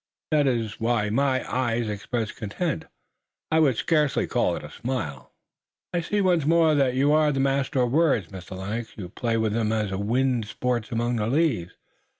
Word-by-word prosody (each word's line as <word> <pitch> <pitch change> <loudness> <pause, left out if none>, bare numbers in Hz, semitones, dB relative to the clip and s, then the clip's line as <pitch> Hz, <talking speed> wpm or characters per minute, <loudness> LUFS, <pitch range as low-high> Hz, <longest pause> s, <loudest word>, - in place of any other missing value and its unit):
That 150 -2 +3
is 115 -5 -1
why 115 -2 +1
my 130 +2 +1
eyes 120 -2 0
expressed 110 +2 -3
content 110 - -3 0.7
I 160 - +4
would 140 -6 +4
scarcely 150 -4 +2
call - - +1
it - - -7
a - - -9
smile." 95 - -4 0.6
"I 175 - +1
see 205 +5 0
once 180 -5 +3
more 165 +1 +4
that 135 -4 +2
you're 145 +3 +3
a 150 - +2
master 135 -1 +1
of 120 - 0
words, 140 - +2
Mr. 95 -1 -9
Lennox. 110 +5 -4
You 90 -4 -6
play 115 +3 -1
with 110 -2 0
them 110 -1 0
as 105 -3 -1
the 95 - -2
wind 120 +2 +1
sports 120 0 -2
among 120 +1 0
the 105 -1 -1
leaves." 125 - +1
120 Hz, 180 wpm, -25 LUFS, 110-140 Hz, 0.7 s, I